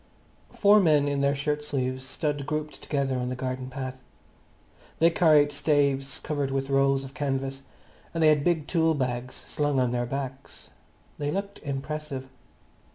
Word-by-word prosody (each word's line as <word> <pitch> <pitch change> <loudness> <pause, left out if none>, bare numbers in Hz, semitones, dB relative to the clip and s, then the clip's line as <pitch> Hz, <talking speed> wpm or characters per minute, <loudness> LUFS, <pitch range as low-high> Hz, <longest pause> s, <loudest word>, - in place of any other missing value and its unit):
Four 205 +1 +5
men 150 -6 +4
in 140 -1 0
their 140 0 +2
shirt 150 +1 -1
sleeves 130 -3 -2
stood 145 +1 -3
grouped 150 0 -3
together 135 -3 -1
on 125 0 -2
the 130 - -3
garden 130 0 -4
path. 130 -1 -6 1.0
They 165 +1 +5
carried 155 -3 +5
staves 140 -2 +1
covered 145 -3 -2
with 135 0 -2
rolls 135 0 +3
of 135 0 -9
canvas, 135 -1 -2 0.5
and 165 -1 0
they 155 - +7
had 150 -2 +3
big 165 -3 +1
tool 160 -2 +2
bags 125 -2 -2
slung 145 -2 -1
on 125 -2 +2
their 120 0 -1
backs. 135 +1 -6 0.5
They 145 0 -1
looked 200 +4 -3
impressive. 140 -1 -5
140 Hz, 160 wpm, -27 LUFS, 135-150 Hz, 1.0 s, they